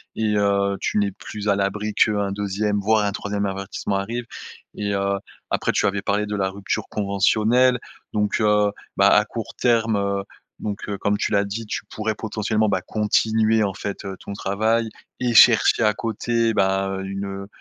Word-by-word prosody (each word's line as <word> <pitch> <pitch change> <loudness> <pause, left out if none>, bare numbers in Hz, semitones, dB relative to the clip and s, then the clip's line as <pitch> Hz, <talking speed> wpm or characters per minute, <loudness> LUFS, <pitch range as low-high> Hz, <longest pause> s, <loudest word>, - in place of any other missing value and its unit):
et 110 -1 0
heu, 100 -1 +1
tu - - -1
n'es 100 -1 +1
plus 105 +2 -7
à 100 - +4
l'abri 105 +2 -1
qu'un 100 -2 +2
2e, 105 +1 -1
voire 105 +1 +2
un 100 - 0
3e 100 0 -3
avertissement 100 0 -3
arrive 115 +5 -3 0.5
et 100 -1 -2
heu, 100 0 0 0.3
après - - 0
tu - - +1
avais 100 0 0
parlé 105 +1 0
de 105 0 -3
la 95 -2 0
rupture 100 +1 -3
conventionnelle, 110 +5 +2 0.4
donc, 105 +1 0
heu, 105 -1 +3 0.3
bah - - +6
à - - +5
court - - -6
terme, 115 -2 +2
heu, 100 0 -1 0.4
donc, 105 -1 -4
heu, 100 -1 -3
comme 100 +1 0
tu 110 - -1
l'as 100 0 +3
dit 105 +3 -5
tu - - -3
pourrais 110 0 -2
potentiellement, 110 0 -1
bah 90 - 0
continuer 110 +2 +2
en 100 -2 -1
fait, 100 +1 -5
heu, 95 -1 -5
ton - - -9
travail 110 +4 0 0.3
et 125 -1 0
chercher 110 - +6
à 105 -1 +4
côté, 115 +1 -1
bah 95 0 +1
une, 95 +1 -4
heu, 100 0 -6
105 Hz, 185 wpm, -22 LUFS, 100-110 Hz, 0.5 s, bah